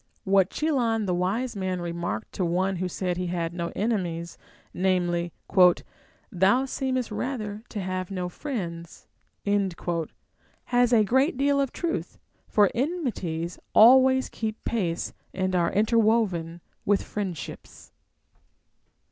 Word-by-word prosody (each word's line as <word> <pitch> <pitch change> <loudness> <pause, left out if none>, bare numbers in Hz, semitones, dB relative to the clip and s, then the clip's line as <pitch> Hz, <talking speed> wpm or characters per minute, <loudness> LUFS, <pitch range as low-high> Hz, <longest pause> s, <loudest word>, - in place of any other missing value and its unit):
What 195 -1 +3
Chilon 240 -8 0
the 180 - 0
wise 205 +8 -1
man 185 -2 -2
remarked 170 +3 -4
to 190 - -2
one 185 +2 0
wlio 185 +1 -2
said 180 0 -2
he 180 0 -2
had 170 -1 -2
no 170 -1 -3
enemies, 175 -6 -2 0.4
namely, 175 -2 0 0.5
" - - -32
Thou 245 +8 +5
seemest 260 -3 -2
rather 215 -3 -3
to 215 - -5
have 185 -1 -3
no 185 -2 -3
friends," 175 - -6 0.4
has 200 +5 -2
a 225 -3 +5
great 265 - +2
deal 280 +1 +2
of 275 - -1
truth; 340 -1 -3 0.3
for 205 -2 +4
enmities 225 - -2 0.2
always 260 +3 +7
keep 220 -1 -5
pace 180 -7 -1 0.2
and 185 0 0
are 170 -1 +2
interwoven 210 -6 +2 0.2
with 205 0 +2
friendships. 190 -8 -6
195 Hz, 120 wpm, -26 LUFS, 175-235 Hz, 0.5 s, always